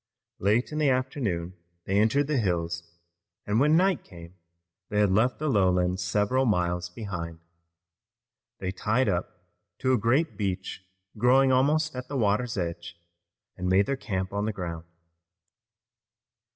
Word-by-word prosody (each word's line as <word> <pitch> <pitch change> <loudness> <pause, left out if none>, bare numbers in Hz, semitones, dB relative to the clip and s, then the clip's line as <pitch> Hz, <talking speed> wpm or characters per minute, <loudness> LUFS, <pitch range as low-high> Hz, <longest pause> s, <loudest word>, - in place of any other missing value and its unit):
Late 110 +8 +1
in 155 - -3
the 150 -2 +3
afternoon 125 - -1 0.3
they 100 +1 +1
entered 125 +7 +3
the 145 -2 0
hills, 85 -4 -1 0.6
and 105 +2 +1
when 150 +4 +4
night 185 -1 +2
came 85 -2 -13 0.6
they 105 - 0
had 105 -2 +3
left 110 +6 +2
the 155 - -2
lowlands 90 -6 +2
several 105 +7 +1
miles 90 -3 0
behind. 90 -5 -6 1.2
They 95 -1 -3
tied 110 +6 0
up 90 -1 -2 0.3
to 130 0 +1
a 125 - +3
great 130 +9 +1
beech 95 -2 -3 0.4
growing 130 +2 +5
almost 150 +4 +2
at 125 0 -6
the 140 - -3
water's 110 +1 +1
edge, 85 -1 -4 0.6
and 90 0 -3
made 95 +2 +4
their 140 - -1
camp 95 -7 -4
on 100 +1 -1
the 110 - 0
ground. 85 -4 -5
105 Hz, 145 wpm, -27 LUFS, 90-130 Hz, 1.2 s, growing